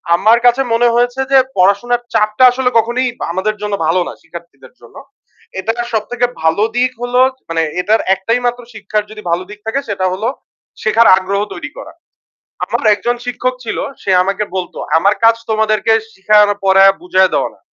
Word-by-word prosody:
আমার 220 +6 +4
কাছে 245 +2 +4
মনে 240 +1 +3
হয়েছে 245 +2 0
যে 270 - +6 0.2
পড়াশোনার 200 +6 +2
চাপটা 215 +4 +2
আসলে 250 0 0
কখনোই 240 +3 +1 0.2
আমাদের 195 +4 -2
জন্য 210 -1 -3
ভালো 180 +2 +2
না, - - -6
শিক্ষার্থীদের 170 - -13
জন্য। - - -17 0.6
এটা 225 +3 -1 0.2
সবথেকে 245 +3 -1 0.2
ভালো 160 +6 +2
দিক 250 +1 +1
হলো 245 +1 0 0.2
জ - - -39
মানে 165 0 0 0.2
এটার 215 +4 +1
একটাই 230 +6 -1
মাত্র 245 0 -1
শিক্ষার 210 0 -3
যদি 215 0 -10
ভালো 175 +2 0
দিক 210 0 -11
থাকে 270 +5 -1
সেটা 195 -2 -2
হলো, 205 +5 -3 0.6
শেখার 225 +2 +3
আগ্রহ 195 +1 -2
তৈরি 295 - -8
করা। - - -10 0.7
আমার - - -3
এক - - -5
জন 240 0 +1
শিক্ষক 250 +1 -2
ছিল, 225 - -4 0.2
সে - - -6
আমাকে 195 +2 -2
বলত 180 -2 -4 0.2
আমার 200 +5 +3
কাজ 230 0 +6
তোমাদেরকে 220 0 +1 0.2
শিখানো, 210 +1 +3
পড়য়া 195 0 +6
বুঝায়া 185 +1 +2
দেওয়া - - 0
না। - - -28
215 Hz, 175 wpm, -15 LUFS, 195-240 Hz, 0.7 s, যে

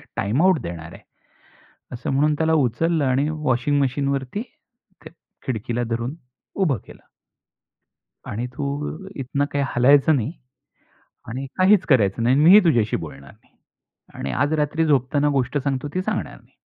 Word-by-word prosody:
Time 105 +9 0
out 185 -4 +4
देणार 85 -4 -7
आहे." - - -13 0.9
असं 120 0 -5
म्हणून 145 +3 +2
त्याला 160 +1 +1
उचललं 155 +6 0
आणि 135 +3 +1
वॉशिंग 145 -2 0
मशीन 140 +1 0
वरती 140 - -3 0.6
त्या 155 - -11 0.3
खिडकीला 120 0 -2
धरून 120 +5 -2 0.4
उभं 170 - +1
केलं. - - -15 1.2
आणि 115 +4 -4
तू 145 +2 -3 0.2
इथनं 140 +1 -2
काही 140 0 0
हलायचं 140 +5 +5
नाही 125 +1 -2 1.0
आणि 130 +4 -4
काहीच 185 +1 +4
करायचं 115 -5 +3
नाही 125 +3 +3
आणि 145 - +3
मीही 185 +6 +9
तुझ्याशी 120 -10 +2
बोलणार 70 0 -10
नाही. - - -28 0.6
आणि 70 - -5
आज 145 +3 0
रात्री 155 +1 0
झोपताना 145 0 +2
गोष्ट 130 +3 -1
सांगतो 140 0 -2
ती 185 - 0
सांगणार 215 +2 -3
नाही. - - -29
140 Hz, 150 wpm, -22 LUFS, 120-155 Hz, 1.2 s, मीही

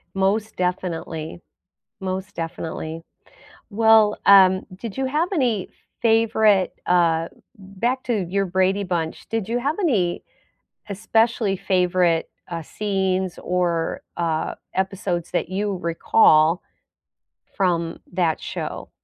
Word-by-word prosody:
Most 205 +3 0
definitely. 165 - -3 0.6
Most 190 +1 -4
definitely. 165 0 -5 0.7
Well, 220 0 +5
um, 190 -1 +7
did 205 +1 -7
you 265 - 0
have 310 +6 0
any 240 - 0 0.3
favorite, 220 -4 +3
uh 170 -2 +2 0.3
Back 210 +7 -3
to 215 -7 0
your 195 +1 0
Brady 190 +2 +1
Bunch, 170 -3 -3
did 225 -2 -2
you 240 +1 0
have 285 +5 -1
any 200 - +1 0.7
especially 220 0 +1
favorite, 180 -3 +1 0.2
uh, 170 -2 -4
scenes, 190 -1 -2
or, 175 -2 -1
uh, 165 -2 -1 0.2
episodes 190 -2 -2
that - - -1
you 200 +1 -2
recall 165 -1 +3 1.0
from 170 -3 0
that 175 -3 0
show? - - -5
190 Hz, 105 wpm, -22 LUFS, 175-210 Hz, 1.0 s, um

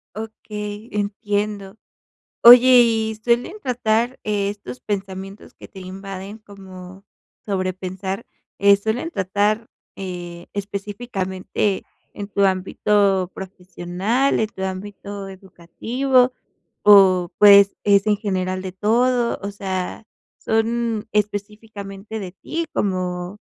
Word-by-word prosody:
Okey, 210 0 -7
entiendo. 205 -1 -2 0.7
Oye, 245 +1 +9
¿y 220 -2 +2
suelen 245 - 0
tratar 240 0 0
estos 200 -11 -3
pensamientos 195 0 -6
que - - -14
te 190 - -12
invaden 195 +2 -8
como 190 -2 -13 0.4
sobrepensar, 190 +1 -3 0.3
eh, 200 0 +6
suelen 220 +10 -3
tratar, 205 - 0 0.3
eh, 175 -2 -7
específicamente 200 -1 -3 0.3
en 205 - -6
tu 200 -1 0
ámbito 190 0 +1
profesional, 190 +7 -2
en 220 - +2
tu 190 -4 -9
ámbito 200 +1 -6
educativo, 235 +8 0 0.5
o 190 -4 +6
pues, 200 -1 +7
es 200 0 +4
en 210 - +3
general 185 -3 -2
de 185 - -6
todo?, 235 +5 +1
o 200 - -3
sea, 195 +1 -5 0.3
¿son 225 0 -1
específicamente 210 0 -4
de 185 -3 -7
ti, 330 +11 -4
como 180 -1 -2
200 Hz, 100 wpm, -21 LUFS, 190-220 Hz, 0.7 s, Oye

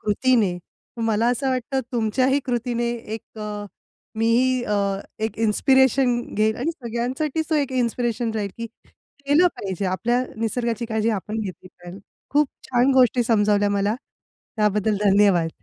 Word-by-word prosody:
कृतीने. 210 -4 +1 0.4
मला 225 +1 +1
असं 265 +2 -1
वाटतं, 260 +1 -1
तुमच्याही 255 +4 +1
कृतीने 240 -1 -1 0.2
एक 225 - -11
अ, 210 -1 -5 0.5
मीही 245 +3 +2
अ, 210 - -1 0.5
एक 220 -1 -4
इन्स्पिरेशन 255 +2 +3
घेईल 215 +1 +1
आणि 285 +7 -1
सगळ्यांसाठी 265 +3 -2
तो 315 - +2
एक 280 -3 -1
इन्स्पिरेशन 240 -2 -1
राहील, 205 -2 -2
की 230 - -4 0.6
केलं 300 +6 +5
पाहिजे, 190 0 -4
आपल्या 240 +7 0
निसर्गाची 235 +1 -2
काळजी 220 0 0
आपण 220 +3 -5
घेतली 185 -2 -7
पाहिजे. 175 +2 -12 0.3
खूप 290 -1 +3 0.2
छान 250 +2 +3
गोष्टी 250 -1 +4
समजावल्या 205 -2 +2
मला. 200 +1 +1 0.6
त्याबद्दल 210 0 +1
धन्यवाद. 195 -5 +3
230 Hz, 135 wpm, -23 LUFS, 210-255 Hz, 0.6 s, केलं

